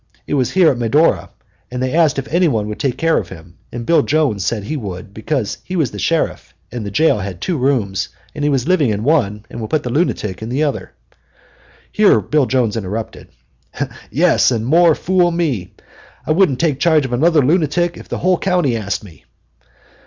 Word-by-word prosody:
It - - -4
was 130 -4 +1
here 185 -4 +4
at 125 - -4
Medora, 130 +8 +2 0.4
and 125 - -5
they 130 +1 -1
asked 160 -4 +3
if 135 - -3
anybody 150 - +2
would 105 - -6
take 130 -3 -1
care 165 0 +2
of 90 - -7
him, 85 -1 -13
and 120 -1 -6
Bill 170 - +4
Jones 145 -11 0
said 105 +2 -2
he 135 +10 -4
would, 100 -5 -7
because 110 +1 -3
he 185 - -6
was 155 -9 0
the 105 - -7
sheriff - - -1 0.2
and 120 -1 -5
the 100 - -4
jail 110 +2 +2
had 95 -3 -6
two 180 - -2
rooms, 120 - 0 0.2
and 150 - -5
he 145 - +2
was 135 -1 0
living 170 -8 +3
in 105 0 -2
one 110 -8 +1
and 120 - -8
would 110 - -5
put 155 -2 0
the 125 - -4
lunatic 110 - -1
in 110 - -5
the 135 +5 0
other." 145 -2 -3 1.0
Here 205 - +4
Bill 140 +6 +1
Jones 120 -5 +1
interrupted: 110 +1 -5 0.8
"Yes, - - +3
and 115 -3 -1
more 165 +4 +4
fool 180 -1 +2
me! 145 - -2 0.5
I - - -1
wouldn't 155 -6 +3
take 155 -5 0
charge 155 -2 +3
of 125 - -4
another 155 +2 +3
lunatic 170 +2 +1
if - - -12
the - - -3
whole 185 -1 +1
county 180 -10 +1
asked 100 -3 -3
me. 85 -10 -15
130 Hz, 205 wpm, -17 LUFS, 110-160 Hz, 1.0 s, here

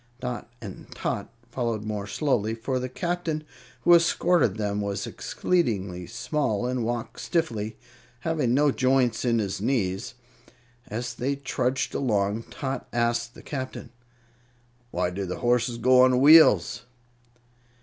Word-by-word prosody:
Dot 125 -1 -5
and 95 -3 -9
Tot - - -3 0.2
followed 115 -4 -2
more 105 -2 -4
slowly, 110 -1 0
for 130 +3 -2
the 130 0 -4
Captain 170 +1 -2 0.4
who 175 - +6
escorted 170 - +3
them 105 -1 -1
was 100 -1 -2
exceedingly 100 - -1
small 120 -2 -1
and 125 -1 -1
walked 120 0 -3
stiffly, 110 -10 -2 0.4
having 150 -5 0
no 145 +1 +4
joints 130 -3 +2
in 120 -2 +2
his 100 -3 -2
knees. 105 -2 -1 0.7
As 120 0 -4
they 135 +4 -1
trudged 130 -1 -1
along 105 -3 0
Tot 135 -2 -4
asked 120 0 0
the - - -13
Captain: 130 -3 -6 1.0
"Why 90 -3 -1
do 100 +2 -4
the 90 - -4
horses 120 0 +1
go 125 +2 +5
on 130 -1 +5
wheels?" 145 - +6
120 Hz, 130 wpm, -26 LUFS, 105-135 Hz, 1.0 s, who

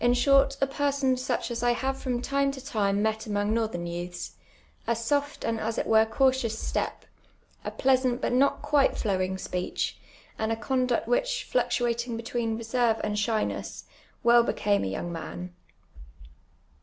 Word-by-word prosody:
shoit, 275 +2 +4
a - - +3
jK'ison 280 -1 0
siieh 255 -1 -2
as 235 0 -3
I 240 0 +3
have 265 +2 -1
from 250 -2 -3
tinie 275 0 +1
to 265 -1 -9
time 205 -6 +1
met 220 0 +1
amoii^ 205 -1 -1 0.2
iiortlurn 175 -2 -4
youths: 175 +1 -5 0.6
a 235 - +2
soft 285 +6 -1
and 225 -1 -1
as 225 +1 -2
it - - 0
witc 220 0 +4
eautious 260 -4 +2
stcj), - - -1 0.7
a - - -3
pKu 260 0 +2
.*<aiit 240 - -5
but - - -1
not 275 +3 +2
(juite 290 -2 +2
ilowin;; 190 -3 0
s|)eeeh, 180 -1 -2 0.5
and 220 0 0
a - - +1
eonduct 255 0 0
which, - - 0
fluc - - +3
tuating 235 -1 -1
between 230 -1 -2
reserve 230 0 +1
and 210 0 -1
shyness, 215 0 -2 0.4
well 235 0 +6
iK'came 205 -3 +1
a - - -3
younp; 175 - -4
man. 175 +2 -6
235 Hz, 165 wpm, -27 LUFS, 215-265 Hz, 0.7 s, well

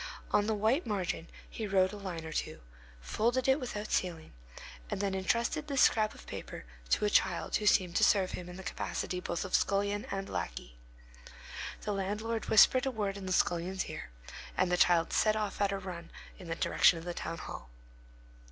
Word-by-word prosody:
On 205 0 +3
the 220 - +1
white 225 - +1
margin 185 -5 -2 0.2
he 220 - -5
wrote 190 -1 +3
a - - -6
line 180 -5 -5
or 160 - -6
two, - - -3 0.4
folded 240 - 0
it 265 +2 +4
without 215 -5 -5
sealing, 170 -4 -2 0.6
and - - -3
then 200 -1 0
intrusted 235 +10 0
this 275 -3 +1
scrap 215 -1 +3
of - - -13
paper - - -7 0.2
to - - +2
a - - +3
child - - +2
who 210 - -2
seemed 180 -3 +3
to - - +3
serve 190 -3 +4
him 180 -1 -6
in 180 - -9
the 190 - -8
capacity 180 0 -3
both 180 0 -3
of 190 - -8
scullion 200 +1 +1
and 195 0 -3
lackey. - - -5 1.1
The 210 - -2
landlord 210 +4 -2
whispered 255 +4 +6
a - - +3
word 210 -5 -2
in 195 -2 -7
the - - -3
scullion's 180 +1 +1
ear, - - -7 0.5
and 185 -1 +2
the - - +4
child 175 -1 +3
set 215 0 +3
off 210 -1 -2
on 200 - +3
a 195 - -1
run 180 -3 -7 0.3
in 180 - -10
the 165 - -2
direction 170 - +4
of 165 - -8
the 175 - -3
town 165 0 -5
hall. 65 - -8
195 Hz, 200 wpm, -32 LUFS, 180-215 Hz, 1.1 s, whispered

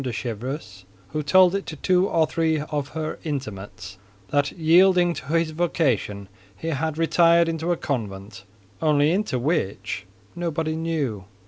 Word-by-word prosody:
de 130 - -2
Chevreuse, 115 -3 -5 0.3
who 155 - -2
told 180 +5 +5
it 195 0 -2
to 160 - -5
two 185 +5 +2
or 160 -1 +3
three 160 0 0
of 150 -2 -3
her 155 -1 -3
intimates, 105 - -6 0.3
that, 145 0 +1
yielding 175 +2 +4
to 140 - -8
his 165 +1 +1
vocation, 135 - 0 0.3
he 165 - -4
had 160 +1 -2
retired 170 +1 +4
into 165 +1 -1
a 175 - +1
convent—only 105 +5 -2
into 195 -7 0
which, 120 - -2 0.3
nobody 160 -2 -2
knew. 150 - -2
155 Hz, 140 wpm, -24 LUFS, 115-165 Hz, 0.3 s, told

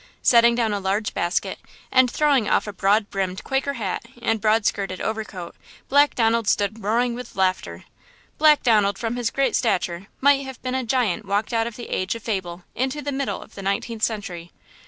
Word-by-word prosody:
Setting 235 -1 +6
down 225 -3 +1
a 205 - -1
large 200 +2 -1
basket, 175 +2 -1 0.3
and 255 -1 +5
throwing 280 -5 +2
off - - +2
a 210 - -6
broad 200 +3 +1
brimmed 190 -1 -3
Quaker 270 +1 -1
hat 210 -8 -3 0.2
and 225 -2 0
broad 220 0 +2
skirted 195 -2 -1
overcoat, 210 -6 -5 0.3
Black 285 +2 +4
Donald 230 -3 +2
stood 205 +2 0
roaring 235 +4 +1
with 250 +1 -8
laughter. 185 -1 -1 0.6
Black 300 -1 +5
Donald, 210 -4 +3
from 230 +2 -3
his 240 -2 -1
great 275 +3 0
stature, 185 -5 0
might 280 0 +4
have 265 -2 -8
been 255 0 -2
a 260 0 -1
giant 225 -4 0
walked 205 +4 -1
out 225 0 +1
of 235 - -7
the 240 - -8
age 185 +4 -1
of 230 - -9
fable 185 -5 -3
into 265 +4 -2
the 285 - -2
middle 275 0 -3
of - - -20
the 195 - -8
nineteenth 205 +3 -2
century. 185 -7 -3
225 Hz, 195 wpm, -23 LUFS, 195-250 Hz, 0.6 s, Setting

